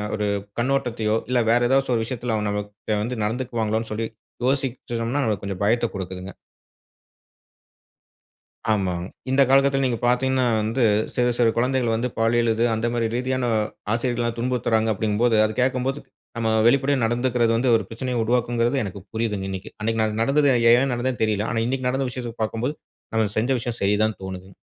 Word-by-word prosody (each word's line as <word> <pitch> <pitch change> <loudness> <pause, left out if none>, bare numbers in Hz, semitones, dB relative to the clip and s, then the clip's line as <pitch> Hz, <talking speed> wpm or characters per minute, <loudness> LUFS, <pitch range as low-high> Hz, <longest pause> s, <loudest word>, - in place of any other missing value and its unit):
ஒரு 105 - -1 0.3
கண்ணோட்டத்தையோ, 120 -4 0
இல்ல 125 -1 +2
வேற 120 0 +3
ஏதாசச்சு 135 -1 +2
ஒரு 115 - 0
விஷயத்துல 120 -2 -3
அவங்க 105 -1 -1
நம்ம 105 0 -1
கிட்ட 105 +1 -3
வந்து 120 -1 -3
நடந்துக்குவாங்களோன்னு 115 -1 -2
சொல்லி 110 +1 -2 0.4
யோசிச்சோன்னா, 130 -1 -1
அது 100 - -3
கொஞ்சம் 100 -1 -5
பயத்த 120 +2 +2
குடுக்குதுங்க. 95 0 -6 2.4
ஆமாங்க. 90 -5 0 0.2
இந்த 135 +1 +3
காலகட்டத்துல 135 0 +4
நீங்க 125 -2 0
பாத்தீங்கன்னா 130 +1 +2 0.2
வந்து, 115 +4 0 0.3
சிறு 125 0 +2
சிறு 120 -2 +4
குழந்தைகள் 125 -1 +1
வந்து, 125 +2 -1
பாலியல் 115 0 +3
இது, 115 +2 0
அந்த 110 +1 -1
மாரி 120 -1 0
ரீதியான, 130 0 -1 0.5
ஆசிரியர்கள்லாம் 120 -1 -1
துன்புறுத்துறாங்க 115 -3 +1
அப்டிங்கும்போது, 110 +3 +1
அத 110 - -1
கேக்கம்போது, 130 +2 0 0.4
நம்ம 115 -1 0 0.2
வெளிப்படையா 135 +2 +3
நடந்துக்குறது 120 0 +1
வந்து, 125 0 +2
ஒரு 110 - -5
பிரச்சனைய 125 +1 -3
உருவாக்கும்ங்குறது, 120 +2 +1
எனக்கு 100 -1 -6
புரியிதுங்க 105 -4 -2
இன்னைக்கு. 95 0 -6
அன்னைக்கு 115 0 0
நா 110 - +2 0.2
நடந்தது, 140 +3 +3 0.2
ஏன் 130 +2 +3
நடந்ததுன்னு 125 -1 -1
தெரியல. 105 0 0
ஆனா, 115 - 0
இன்னைக்கு 130 0 -1
நடந்த 135 0 -1
விஷயத்த 120 -2 -6
பாக்கும்போது, 115 +7 -2 0.4
நம்ம 110 -2 +2
செஞ்ச 120 +5 +1
விஷயம் 120 0 -4
சரி 100 +1 +3
தானு 110 -2 0
தோணுதுங்க. 95 0 -7
120 Hz, 160 wpm, -23 LUFS, 110-125 Hz, 2.4 s, காலகட்டத்துல